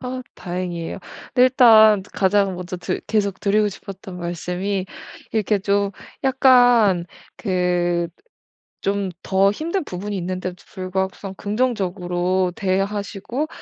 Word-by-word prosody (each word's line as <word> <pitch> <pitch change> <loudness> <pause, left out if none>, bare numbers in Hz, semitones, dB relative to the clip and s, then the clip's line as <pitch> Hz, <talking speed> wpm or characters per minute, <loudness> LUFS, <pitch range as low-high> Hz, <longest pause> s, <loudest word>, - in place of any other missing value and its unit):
아 255 0 -5
다행이에요. 175 -1 -4 0.4
일단 225 -5 +7
가장 195 -1 +2
먼저 180 +1 -5
드 180 - -3
계속 200 -3 0
드리고 210 +1 +2
싶었던 190 -2 -9
말씀이 180 +3 -3 0.5
이렇게 215 -1 +1
좀 200 +1 +1 0.3
약간 245 -9 +5 0.3
그 180 -3 0 0.7
좀 200 -1 -1
더 195 +1 +3
힘든 335 - -2
부분이 205 - -5
있는데도 185 0 -3
불구하고서는 190 +1 -4
긍정적으로 185 -5 -1
대하시고 200 +7 -2
195 Hz, 250 characters per minute, -21 LUFS, 180-215 Hz, 0.7 s, 일단